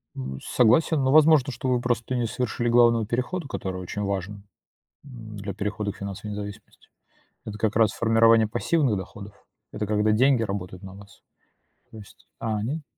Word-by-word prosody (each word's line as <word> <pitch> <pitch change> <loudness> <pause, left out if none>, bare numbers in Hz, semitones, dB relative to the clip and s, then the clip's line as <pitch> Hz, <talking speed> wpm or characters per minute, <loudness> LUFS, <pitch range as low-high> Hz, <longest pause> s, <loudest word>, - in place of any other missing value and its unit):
М, 65 0 -6
согласен, 135 +5 +2
но, 130 - +2
возможно, 150 -2 +5
что 125 +1 -5
вы 125 -1 +1
просто 120 0 -1
не 120 -1 0
совершили 120 0 -2
главного 115 -1 +4
перехода, 125 - -3
который 95 -7 -5
очень 100 +3 -5
важен, 100 0 -4 0.6
м, 115 -6 -11
для 100 -1 -6
перехода 105 +1 -3
к - - -17
финансовой 100 +1 -6
независимости. 100 0 -10 0.6
Это 105 -1 -6
как 105 0 -1
раз 110 -1 +3
формирование 115 -1 +4
пассивных 120 +1 0
доходов. 100 +2 -9 0.4
Это 105 - -3
когда 105 +1 +1
деньги 130 +3 +3
работают 95 -3 -5
на 95 0 -10
вас. 100 0 -16 0.7
То 110 - -11
есть, 105 -2 -15
а, 110 -2 -2
они 135 +10 -3
110 Hz, 165 wpm, -25 LUFS, 100-125 Hz, 0.7 s, возможно